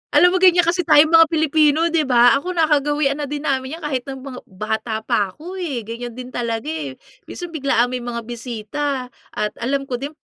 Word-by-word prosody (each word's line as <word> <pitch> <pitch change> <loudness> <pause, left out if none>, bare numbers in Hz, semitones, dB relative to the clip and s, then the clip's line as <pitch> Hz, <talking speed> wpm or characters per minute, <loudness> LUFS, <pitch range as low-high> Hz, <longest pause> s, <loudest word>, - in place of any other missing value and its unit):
Alam 355 0 +6
mo - - +3
ganyan 355 -2 +5
kasi 345 +2 +1
tayong 315 -1 +5
mga 330 -1 +7
Pilipino, 315 0 +3
di 330 - +3
ba? 245 -1 +6
Ako 360 +6 -4
nakagawian 295 -3 +1
na 285 - -4
din 295 +1 -5
namin 265 +2 -1
'yan 335 - -15
kahit 265 -4 -2
ng 265 -1 -6
mga 265 -2 -8
bata 220 +3 -3
pa 205 -2 +1
ako 355 - -9
eh, 270 -10 -4
ganyan 235 +2 -6
din 250 0 -7
talaga 230 -2 -3
eh. 150 -4 -5 0.3
Minsan 350 -2 -7
biglaang 255 -5 +1
may 250 - -3
mga 235 -1 -4
bisita, 245 +3 -4 0.3
at 210 0 -2
alam 275 +3 -1
ko 260 - -3
din 285 +2 -4
275 Hz, 205 wpm, -20 LUFS, 240-315 Hz, 0.3 s, mga